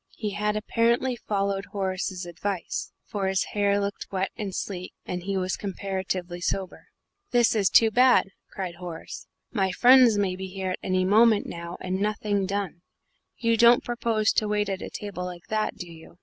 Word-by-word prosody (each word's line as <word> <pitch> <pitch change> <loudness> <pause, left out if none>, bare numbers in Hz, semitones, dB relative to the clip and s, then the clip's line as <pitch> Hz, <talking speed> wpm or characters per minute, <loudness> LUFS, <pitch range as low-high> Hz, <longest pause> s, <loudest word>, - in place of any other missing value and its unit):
He 210 -2 -3
had 210 +1 -1
apparently 235 +4 +1
followed 200 -3 -2
Horace's 190 -2 -3
advice, 175 +1 -4
for 200 -2 -2
his 190 0 +1
hair 200 -1 +2
looked 200 0 -3
wet 190 0 -1
and 205 -3 -4
sleek, 185 -1 -5
and 180 -1 -4
he 195 +2 -2
was 185 0 -1
comparatively 190 -2 -4
sober. 190 +1 -3 0.4
"This 240 -2 +4
is 205 -4 +2
too 225 -1 +5
bad!" 250 -4 +4 0.2
cried 180 -3 -5
Horace; 175 -3 -8 0.2
"my 195 -6 +1
friends 245 +1 +6
may 195 -2 0
be 190 +1 -6
here 190 0 -4
at - - -4
any 185 0 +1
moment 215 +2 +5
now 170 +1 -7
and 185 +1 -2
nothing 205 -2 0
done. 195 -4 -3 0.6
You 230 -1 +2
don't 235 +1 +6
propose 230 -3 +1
to 215 - +1
wait 210 -1 0
at 190 -1 -2
table 190 -3 -5
like 175 -1 -8
that, 215 0 0
do 180 - -7
you?" 165 +1 -14
200 Hz, 175 wpm, -26 LUFS, 185-215 Hz, 0.6 s, friends